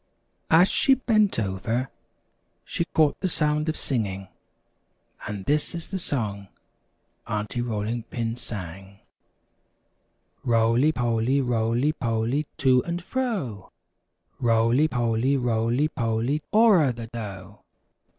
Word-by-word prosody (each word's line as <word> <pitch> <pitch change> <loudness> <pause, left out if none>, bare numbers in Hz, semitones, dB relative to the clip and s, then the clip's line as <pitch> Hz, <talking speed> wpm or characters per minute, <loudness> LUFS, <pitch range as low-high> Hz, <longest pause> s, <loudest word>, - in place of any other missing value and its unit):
As 170 +3 +6
she 270 - +4
bent 215 -5 +2
over, 110 +5 -2 0.7
she 170 - -2
caught 155 -3 +2
the 185 - -1
sound 150 -1 0
of 155 - -1
singing, 100 -7 -3 1.0
and 100 -2 -5
this 150 +3 0
is 170 - -7
the 190 - -3
song 105 - -3 0.8
Aunty 105 +2 -2
Rolling 115 0 -2
Pin 115 -1 -2
sang: 95 -3 -8 1.5
"Roly 115 +4 +3
poly, 120 0 +1
roly 120 +2 +1
poly, 120 +2 -1
To 130 -2 +4
and 170 0 -3
fro, 185 - -3 0.7
Roly 115 +4 +3
poly, 120 +1 +1
roly 120 +3 +1
poly, 120 +2 -1
O'er 205 - +5
the 115 -1 -7
dough. 105 -3 -8
120 Hz, 110 wpm, -25 LUFS, 110-150 Hz, 1.5 s, As